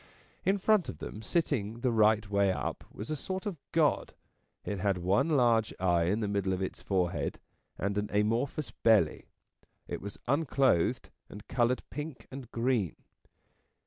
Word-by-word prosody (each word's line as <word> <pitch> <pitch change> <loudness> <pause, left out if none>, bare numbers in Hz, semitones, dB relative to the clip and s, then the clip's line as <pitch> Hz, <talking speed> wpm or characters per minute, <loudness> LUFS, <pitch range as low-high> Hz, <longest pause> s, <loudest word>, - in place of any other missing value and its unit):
In 195 +2 +3
front 205 -1 +3
of - - -6
them, 105 - -7
sitting 115 - -1
the 125 - +2
right 110 -1 +4
way 100 -1 +2
up, - - -3
was 110 +8 -7
a - - 0
sort 185 +7 -4
of 190 -7 -4
god. 160 -3 +2 0.5
It 100 -2 -3
had 100 -1 +1
one 95 - +2
large 120 -7 +3
eye 85 -2 +3
in 100 +6 +1
the 105 - 0
middle 100 -2 0
of 95 - -2
its 95 - -5
forehead, 90 -3 -1 0.4
and 100 +1 -1
an 105 - -3
amorphous 115 +7 0
belly. 105 -9 +3 0.6
It - - -5
was 100 0 -7
unclothed, 135 - +2 0.2
and 105 - -11
coloured 125 0 +1
pink 150 -2 -6
and 130 -3 -8
green. 115 -7 0
110 Hz, 160 wpm, -30 LUFS, 100-135 Hz, 0.6 s, right